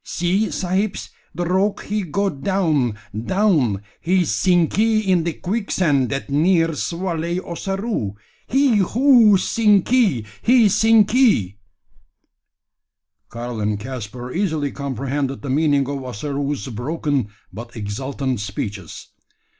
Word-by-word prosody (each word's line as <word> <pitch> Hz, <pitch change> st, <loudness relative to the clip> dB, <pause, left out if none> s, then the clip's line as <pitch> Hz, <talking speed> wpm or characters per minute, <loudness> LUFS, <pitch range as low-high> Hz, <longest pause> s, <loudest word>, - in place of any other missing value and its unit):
See, 185 Hz, +5 st, 0 dB
sahibs, 190 Hz, +2 st, -2 dB, 0.2 s
the 175 Hz, -, -2 dB
rogue 190 Hz, +4 st, 0 dB
he 210 Hz, +1 st, -2 dB
go 195 Hz, +3 st, -1 dB
down, 150 Hz, -, 0 dB, 0.2 s
down 125 Hz, -, +1 dB, 0.2 s
he 180 Hz, +1 st, +1 dB
sinkee 200 Hz, +7 st, +2 dB
in 185 Hz, -2 st, +3 dB
de 170 Hz, -, -1 dB
quicksand 175 Hz, -, 0 dB
that 135 Hz, 0 st, -3 dB
near 165 Hz, +4 st, +2 dB
swalley 170 Hz, +2 st, -3 dB
Ossaroo; 195 Hz, -, -3 dB, 0.3 s
he 265 Hz, -3 st, +3 dB
ho; 230 Hz, +1 st, +5 dB
sinkee! 205 Hz, -, +2 dB, 0.2 s
he 240 Hz, -2 st, +5 dB
sinkee!" 215 Hz, -, +3 dB, 1.7 s
Karl 120 Hz, 0 st, -6 dB
and 105 Hz, 0 st, -1 dB
Caspar 125 Hz, +1 st, -7 dB
easily 160 Hz, -7 st, -1 dB
comprehended 135 Hz, 0 st, -3 dB
the 140 Hz, -, -3 dB
meaning 145 Hz, -2 st, +2 dB
of 140 Hz, -1 st, -4 dB
Ossaroo's 140 Hz, +1 st, -4 dB
broken 135 Hz, +1 st, -2 dB, 0.3 s
but 115 Hz, +4 st, -9 dB
exultant 130 Hz, +4 st, -3 dB
speeches. 100 Hz, -3 st, -6 dB
165 Hz, 105 wpm, -21 LUFS, 130-195 Hz, 1.7 s, ho